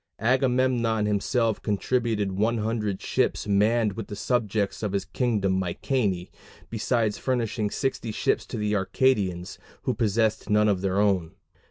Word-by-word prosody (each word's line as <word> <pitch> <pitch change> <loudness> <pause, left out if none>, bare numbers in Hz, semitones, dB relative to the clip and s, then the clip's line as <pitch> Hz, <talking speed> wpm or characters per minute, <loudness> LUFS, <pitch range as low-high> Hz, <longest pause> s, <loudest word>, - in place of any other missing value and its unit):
Agamemnon 125 -2 +2
himself 110 +2 0
contributed 110 -1 0
100 110 0 -1
ships - - 0
manned 105 +1 +2
with 110 0 -6
the 105 - -6
subjects 105 -4 -1
of 105 -3 -2
his 100 - -1
kingdom 100 -7 0
Mycenæ, 95 0 -1 0.4
besides 115 -1 0
furnishing 115 -4 -1
60 125 -2 -2
ships - - 0
to 120 - -5
the 105 0 -1
Arcadians, 95 -3 0 0.2
who 130 - 0
possessed 110 0 0
none 105 0 +4
of 100 -3 +1
their 95 0 0
own. 95 -4 +1
105 Hz, 135 wpm, -26 LUFS, 100-115 Hz, 0.4 s, none